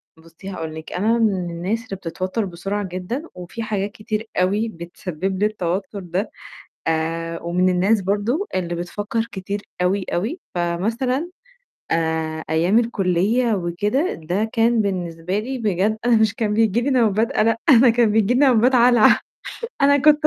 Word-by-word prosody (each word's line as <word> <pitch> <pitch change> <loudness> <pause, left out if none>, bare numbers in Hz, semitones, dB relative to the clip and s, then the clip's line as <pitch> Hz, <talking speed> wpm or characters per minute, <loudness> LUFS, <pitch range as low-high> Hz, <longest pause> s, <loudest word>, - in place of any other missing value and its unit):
بُصّي، 165 +4 -12
هاقول 160 -4 -5
لِك، 160 0 -8
أنا 220 +5 +2
من 195 -6 +1
الناس 180 +7 -2
اللي 220 - -5
بتتوتر 185 +4 -3
بسرعة 195 +3 -3
جدًا، 185 - -4
وفي 180 +6 -7
حاجات 205 -2 -2
كتير 215 0 -4
أوي 205 +5 +1
بتسبب 180 0 -5
لي 205 - +3
التوتر 195 -1 -2
ده، 185 +3 -3 0.6
آآ، 165 +1 -1
ومن 180 +2 +1
الناس 190 +4 +3
برضه 210 - 0
اللي 175 -2 -1
بتفكر 205 +6 -3
كتير 200 +1 -4 0.2
أوي، 190 +2 +1
أوي، 225 - -2
فمثلًا 225 - -1 0.6
آآ، 160 -1 -1
أيام 170 +7 +3
الكُلِّية 225 +2 +1
وكده، 205 - 0
ده 180 +7 -2
كان 230 0 +3
بالنسبة 180 -1 -2
لي 260 +5 -4
بجد 210 -1 0
أنا 240 -1 +5
مش 220 -1 +3
كان 215 -2 0
بييجي 225 +1 +2
لي 265 - 0
نوبات 225 -4 +3
قَلَق، - - -5
أنا 225 +1 +3
أنا 250 -2 +7
كان 230 -1 +3
بييجي 220 +1 +3
لي 250 - +2
نوبات 255 -2 +4
هلع 240 -2 +6 0.6
أنا 285 +1 +5
كنت 300 +2 +5
200 Hz, 155 wpm, -21 LUFS, 175-230 Hz, 0.6 s, أنا